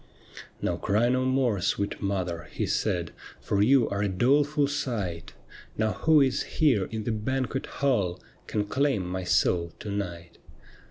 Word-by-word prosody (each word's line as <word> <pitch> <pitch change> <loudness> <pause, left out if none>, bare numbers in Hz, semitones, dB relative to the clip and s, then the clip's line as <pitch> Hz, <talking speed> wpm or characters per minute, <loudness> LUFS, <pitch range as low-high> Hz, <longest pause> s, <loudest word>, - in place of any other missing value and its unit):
' - - -15
Now - - 0
cry 110 +4 +1
no 130 +1 +1
more, 130 -6 +1
sweet 100 +3 -1
mother,' 90 -4 -2
he - - -2
said, 85 -2 -1 0.2
' - - -19
For 100 - +2
you 125 +3 +5
are 100 0 -2
a 105 - +1
doleful 140 - +2
sight. 105 -12 -3 0.4
Now 110 -1 +1
who 155 +9 +4
is 130 -2 +2 0.2
here 130 - +3
in 110 +2 -5
the 115 - -1
banquet 130 +4 -2
hall 100 -11 0 0.3
Can 105 -1 -1
claim 130 -3 0
my 95 +1 -3
soul 85 -1 +1
to 105 - -6
night 85 -4 -5
105 Hz, 165 wpm, -27 LUFS, 95-130 Hz, 0.4 s, you